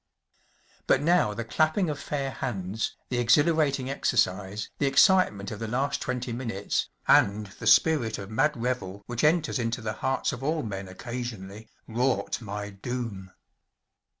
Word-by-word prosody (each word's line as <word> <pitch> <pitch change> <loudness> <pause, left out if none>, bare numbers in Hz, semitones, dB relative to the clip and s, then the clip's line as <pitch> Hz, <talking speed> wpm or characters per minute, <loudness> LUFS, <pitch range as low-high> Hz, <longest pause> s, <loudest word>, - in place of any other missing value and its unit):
But 135 - +3
now 165 -11 +3
the 115 - -4
clapping 155 - +1
of 150 -2 -3
fair 140 -1 -3
hands, 105 -5 -3
the 125 - -1
exhilarating 140 +2 +3
exercise, 100 -6 0
the 140 - +2
excitement 135 - +4
of 105 - -6
the 115 - -4
last 135 +5 -1
twenty 125 -2 -3
minutes, 115 -5 -2 0.2
and 105 +2 +4
the - - -4
spirit 125 -3 +4
of 100 +1 -8
mad 150 +7 +2
revel 110 -5 -3
which 120 -1 -3
enters 155 -2 +2
into 115 0 -1
the 110 -2 -3
hearts 130 +4 -1
of 125 - -7
all 155 +3 0
men 100 -3 -5
occasionally, 110 0 -7 0.2
wrought 120 -2 0
my 105 -1 -5
doom. 100 -2 -5
120 Hz, 150 wpm, -27 LUFS, 105-140 Hz, 0.2 s, excitement